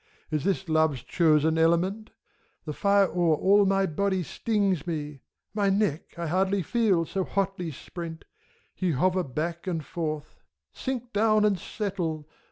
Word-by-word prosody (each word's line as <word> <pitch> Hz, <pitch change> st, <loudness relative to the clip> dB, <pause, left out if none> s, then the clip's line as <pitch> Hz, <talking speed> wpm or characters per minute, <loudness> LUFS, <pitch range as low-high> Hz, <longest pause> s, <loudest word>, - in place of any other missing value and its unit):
Is 155 Hz, -2 st, 0 dB
this 190 Hz, -1 st, 0 dB
Love's 155 Hz, -6 st, +2 dB
chosen 160 Hz, 0 st, +3 dB
element? 180 Hz, +6 st, +2 dB, 0.6 s
The 150 Hz, -, -4 dB
fire 200 Hz, +4 st, +4 dB
o'er 175 Hz, -4 st, +2 dB
all 200 Hz, +5 st, +4 dB
my 195 Hz, 0 st, +3 dB
body 190 Hz, +2 st, 0 dB
stings 195 Hz, -2 st, -1 dB
me; 150 Hz, -4 st, -4 dB, 0.3 s
My 205 Hz, -2 st, +1 dB
neck 195 Hz, -7 st, -1 dB
I 170 Hz, -, -3 dB
scarcely 190 Hz, +3 st, +1 dB
feel, 200 Hz, -6 st, +2 dB
so 190 Hz, +3 st, -2 dB
hotly 195 Hz, -3 st, -2 dB
sprent. 165 Hz, +2 st, -8 dB, 0.3 s
— -, -, -38 dB
Ye 180 Hz, -3 st, 0 dB
hover 185 Hz, +7 st, +2 dB
back 165 Hz, +6 st, -4 dB
and 165 Hz, -5 st, -2 dB
forth; 155 Hz, -3 st, -4 dB, 0.3 s
sink 250 Hz, -2 st, -4 dB
down 215 Hz, 0 st, +3 dB
and 200 Hz, -3 st, +2 dB
settle! 170 Hz, -7 st, -3 dB
180 Hz, 150 wpm, -27 LUFS, 160-200 Hz, 0.6 s, fire